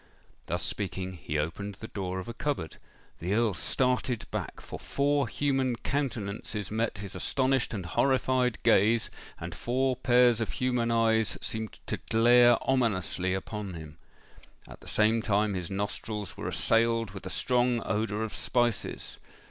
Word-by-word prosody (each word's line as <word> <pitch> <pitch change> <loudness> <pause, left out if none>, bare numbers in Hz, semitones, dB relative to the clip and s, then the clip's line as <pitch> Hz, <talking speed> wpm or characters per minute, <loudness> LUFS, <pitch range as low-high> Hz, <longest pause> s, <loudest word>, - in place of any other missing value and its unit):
Thus - - -2
speaking, 95 -2 -3
he 75 -3 -4
opened 95 +7 -3
the 110 - -8
door 95 -3 -4
of 95 - -5
a 115 - -5
cupboard. 125 - -3 0.4
The 90 +5 -1
Earl 115 -2 +2
started 125 +3 0
back—for - - -5
four 140 -1 +1
human 135 -1 0
countenances 110 -7 -3
met 110 0 -1
his 100 -1 -7
astonished 130 -1 +1
and 100 -6 -4
horrified 130 +4 +2
gaze, 110 +4 +4 0.3
and - - -6
four 130 +2 0
pairs 120 -1 +4
of 110 - -2
human 125 -2 0
eyes 115 -1 +2
seemed 110 -1 -4
to - - -2
glare 120 +1 +6
ominously 95 -7 +1
upon 100 -1 -5
him. 80 -1 -10 0.7
At - - -12
the - - -15
same 110 +2 +3
time 105 -1 +1
his 90 -3 -4
nostrils 105 0 -4
were - - -5
assailed 115 -2 +2
with 95 -1 -8
a - - -4
strong 120 +2 +1
odour 105 +1 -1
of 110 - -4
spices. 120 -3 -1
110 Hz, 150 wpm, -29 LUFS, 100-125 Hz, 0.7 s, glare